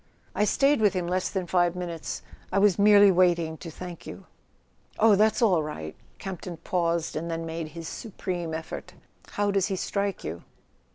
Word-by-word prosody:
"I 210 Hz, -, +2 dB
stayed 275 Hz, +4 st, +3 dB
with 210 Hz, -2 st, +4 dB
him 180 Hz, -1 st, -1 dB
less 180 Hz, +1 st, -1 dB
than 190 Hz, -2 st, -2 dB
five 175 Hz, 0 st, +2 dB
minutes; 170 Hz, -3 st, -5 dB, 0.3 s
I -, -, 0 dB
was 200 Hz, -1 st, +4 dB
merely 205 Hz, -1 st, +7 dB
waiting 170 Hz, -3 st, +2 dB
to 165 Hz, -, -8 dB
thank 175 Hz, +2 st, -9 dB
you." -, -, -9 dB, 0.7 s
"Oh, 220 Hz, -1 st, +6 dB
that's 215 Hz, +4 st, +3 dB
all 185 Hz, -7 st, +4 dB
right." 115 Hz, -, -6 dB, 0.2 s
Campton 180 Hz, -2 st, -6 dB
paused, 170 Hz, -1 st, -1 dB
and 165 Hz, +2 st, -3 dB
then 165 Hz, 0 st, -3 dB
made 165 Hz, 0 st, -4 dB
his 165 Hz, -1 st, -6 dB
supreme 180 Hz, -6 st, -5 dB
effort. 160 Hz, 0 st, -7 dB, 0.4 s
"How 205 Hz, 0 st, +1 dB
does 195 Hz, -1 st, +2 dB
he 195 Hz, -, -1 dB
strike 200 Hz, +1 st, -2 dB
you?" 80 Hz, +2 st, -5 dB
180 Hz, 175 wpm, -27 LUFS, 165-200 Hz, 0.7 s, merely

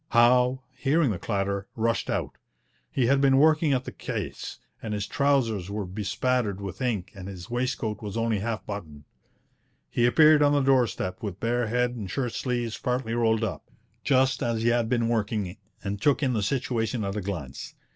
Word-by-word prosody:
Howe, 125 Hz, +2 st, +4 dB
hearing 140 Hz, +2 st, +2 dB
the 95 Hz, -, -3 dB
clatter, 100 Hz, -1 st, -2 dB
rushed 115 Hz, 0 st, 0 dB
out. -, -, -2 dB, 0.5 s
He 130 Hz, -, +1 dB
had 135 Hz, +3 st, +3 dB
been 135 Hz, -1 st, +5 dB
working 155 Hz, +1 st, +4 dB
at 130 Hz, -2 st, +1 dB
the -, -, -6 dB
case, -, -, -5 dB, 0.2 s
and 105 Hz, -2 st, -3 dB
his 105 Hz, 0 st, -2 dB
trousers 120 Hz, -10 st, +1 dB
were 105 Hz, 0 st, -3 dB
bespattered 105 Hz, +2 st, -1 dB
with 100 Hz, +4 st, -7 dB
ink 105 Hz, -7 st, -1 dB
and 95 Hz, -1 st, -9 dB
his 95 Hz, +1 st, -9 dB
waistcoat 120 Hz, -4 st, -2 dB
was 105 Hz, 0 st, -5 dB
only 115 Hz, -2 st, +1 dB
half 110 Hz, +1 st, -3 dB
buttoned. 80 Hz, -8 st, -7 dB, 0.9 s
He 120 Hz, -, +3 dB
appeared 150 Hz, +5 st, +6 dB
on 145 Hz, 0 st, +5 dB
the 145 Hz, -, +3 dB
doorstep 125 Hz, -8 st, +1 dB
with 100 Hz, -3 st, -5 dB
bare 120 Hz, 0 st, 0 dB
head 125 Hz, +2 st, +1 dB
and 110 Hz, -6 st, -6 dB
shirt 125 Hz, -1 st, -2 dB
sleeves 120 Hz, -3 st, -2 dB
partly 125 Hz, -2 st, -1 dB
rolled 115 Hz, -1 st, +2 dB
up, 110 Hz, -, -4 dB, 0.3 s
just 130 Hz, -2 st, +3 dB
as 115 Hz, -1 st, 0 dB
he 120 Hz, -, +4 dB
had 120 Hz, -1 st, +1 dB
been 120 Hz, -2 st, +1 dB
working, 105 Hz, -4 st, -1 dB, 0.3 s
and 100 Hz, 0 st, -3 dB
took 145 Hz, +3 st, +3 dB
in 130 Hz, -2 st, +2 dB
the 110 Hz, -, 0 dB
situation 115 Hz, -1 st, -1 dB
at 100 Hz, 0 st, -3 dB
a 105 Hz, -, -2 dB
glance. 80 Hz, -9 st, -6 dB
115 Hz, 185 wpm, -26 LUFS, 100-125 Hz, 0.9 s, appeared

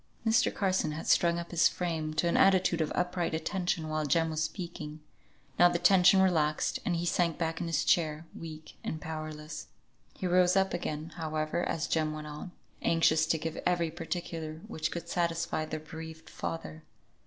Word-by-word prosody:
Mr. 225 Hz, +3 st, +4 dB
Carson 185 Hz, -6 st, 0 dB
had 160 Hz, -, -6 dB
strung 170 Hz, 0 st, +4 dB
up 170 Hz, 0 st, -5 dB
his 170 Hz, -1 st, +5 dB
frame 160 Hz, -3 st, -2 dB
to 165 Hz, +3 st, +2 dB
an 170 Hz, -, +1 dB
attitude 185 Hz, -3 st, +4 dB
of 155 Hz, -, -1 dB
upright 180 Hz, -2 st, 0 dB
attention 175 Hz, -1 st, -1 dB
while 155 Hz, 0 st, -1 dB
Jem 160 Hz, +3 st, +2 dB
was 155 Hz, 0 st, -1 dB
speaking; 155 Hz, -4 st, -5 dB, 0.6 s
now 175 Hz, -, +8 dB
the 175 Hz, -, 0 dB
tension 190 Hz, +2 st, +6 dB
relaxed, 155 Hz, -5 st, +1 dB
and 175 Hz, -, 0 dB
he 170 Hz, +1 st, -1 dB
sank 170 Hz, -1 st, +1 dB
back 165 Hz, -1 st, -2 dB
in 170 Hz, -, -2 dB
his 155 Hz, -2 st, 0 dB
chair, 155 Hz, -1 st, +2 dB
weak 155 Hz, -1 st, -9 dB
and 155 Hz, -, -3 dB
powerless. 155 Hz, -1 st, -6 dB, 0.5 s
He -, -, -4 dB
rose 180 Hz, 0 st, +4 dB
up 190 Hz, 0 st, +2 dB
again, 155 Hz, -2 st, -3 dB
however, 155 Hz, +1 st, -1 dB
as 155 Hz, -, -1 dB
Jem 155 Hz, -1 st, 0 dB
went 155 Hz, 0 st, -6 dB
on, 150 Hz, +4 st, -7 dB, 0.3 s
anxious 160 Hz, -1 st, +3 dB
to 160 Hz, -, +2 dB
give 160 Hz, +1 st, -4 dB
every 170 Hz, -2 st, +1 dB
particular 165 Hz, -1 st, -5 dB
which 160 Hz, -8 st, -2 dB
could 170 Hz, 0 st, -6 dB
satisfy 170 Hz, -2 st, -1 dB
the 155 Hz, -, -4 dB
bereaved 160 Hz, +1 st, -9 dB
father. 160 Hz, -1 st, -5 dB
165 Hz, 175 wpm, -30 LUFS, 155-175 Hz, 0.6 s, now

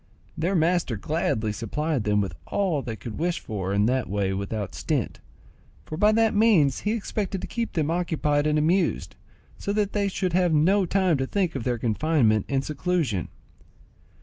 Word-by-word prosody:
Their 175 Hz, +5 st, 0 dB
master 170 Hz, -, +1 dB
gladly 110 Hz, -4 st, -1 dB
supplied 125 Hz, +5 st, -2 dB
them 105 Hz, -1 st, +2 dB
with 95 Hz, -4 st, -3 dB
all 180 Hz, -8 st, 0 dB
they 115 Hz, -4 st, -5 dB
could 110 Hz, 0 st, -8 dB
wish 175 Hz, +1 st, 0 dB
for 95 Hz, -3 st, -4 dB
in 100 Hz, +1 st, +2 dB
that 125 Hz, -4 st, 0 dB
way 100 Hz, -1 st, 0 dB
without 100 Hz, +1 st, -4 dB
stint, -, -, -2 dB, 0.7 s
for 155 Hz, -, -6 dB
by 210 Hz, +6 st, +4 dB
that 225 Hz, 0 st, +3 dB
means 205 Hz, -, +4 dB
he 210 Hz, -, -1 dB
expected 205 Hz, -3 st, -3 dB
to -, -, -4 dB
keep 235 Hz, -1 st, -3 dB
them 160 Hz, -2 st, 0 dB
occupied 155 Hz, -4 st, 0 dB
and 150 Hz, 0 st, +2 dB
amused, 170 Hz, +5 st, +1 dB, 0.4 s
so 200 Hz, -, -2 dB
that 205 Hz, -1 st, 0 dB
they 205 Hz, -1 st, +1 dB
should 185 Hz, -2 st, -2 dB
have 175 Hz, -3 st, +3 dB
no 185 Hz, +5 st, +3 dB
time 185 Hz, -4 st, +2 dB
to 135 Hz, 0 st, -2 dB
think 185 Hz, -2 st, 0 dB
of 130 Hz, -, -4 dB
their 125 Hz, -2 st, 0 dB
confinement 115 Hz, -2 st, +1 dB
and 135 Hz, -1 st, 0 dB
seclusion. 150 Hz, -, -1 dB
155 Hz, 175 wpm, -25 LUFS, 115-185 Hz, 0.7 s, by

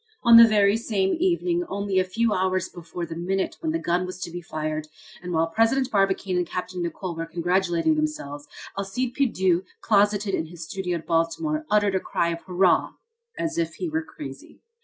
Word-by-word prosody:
On 235 Hz, -1 st, +9 dB
the 230 Hz, 0 st, +10 dB
very 205 Hz, -1 st, +4 dB
same 200 Hz, -4 st, 0 dB
evening 350 Hz, -1 st, +1 dB
only 200 Hz, -1 st, 0 dB
a -, -, +3 dB
few 220 Hz, +4 st, 0 dB
hours 185 Hz, 0 st, 0 dB
before 175 Hz, 0 st, -7 dB
the 165 Hz, 0 st, -7 dB
minute 190 Hz, +3 st, -2 dB
when 320 Hz, -2 st, -2 dB
the 325 Hz, -, 0 dB
gun 175 Hz, -, 0 dB
was 185 Hz, 0 st, -6 dB
to 170 Hz, -, -4 dB
be 175 Hz, +1 st, -6 dB
fired, 155 Hz, -1 st, -4 dB, 0.3 s
and 180 Hz, 0 st, -6 dB
while 165 Hz, -1 st, +2 dB
President 225 Hz, +9 st, +1 dB
Barbicane 195 Hz, -2 st, +1 dB
and 180 Hz, -1 st, 0 dB
Capt. 180 Hz, +1 st, -4 dB
Nicholl 175 Hz, 0 st, -4 dB
were 165 Hz, 0 st, -4 dB
congratulating 175 Hz, -, +1 dB
themselves, 290 Hz, -, -3 dB, 0.3 s
Alcide 200 Hz, +6 st, -2 dB
Pierdeux, 190 Hz, -10 st, +2 dB, 0.2 s
closeted 205 Hz, -1 st, +2 dB
in 160 Hz, -, -1 dB
his 170 Hz, 0 st, -9 dB
studio 180 Hz, 0 st, -3 dB
at 165 Hz, -, -10 dB
Baltimore, 305 Hz, -, 0 dB
uttered 205 Hz, -2 st, +3 dB
a 190 Hz, -, +2 dB
cry 170 Hz, -2 st, -1 dB
of 170 Hz, 0 st, -4 dB
hurrah! 180 Hz, 0 st, +2 dB, 0.4 s
as 330 Hz, 0 st, -2 dB
if 335 Hz, -, -1 dB
he 360 Hz, -, -3 dB
were 320 Hz, +1 st, -1 dB
crazy. -, -, -10 dB
190 Hz, 190 wpm, -25 LUFS, 170-225 Hz, 0.4 s, the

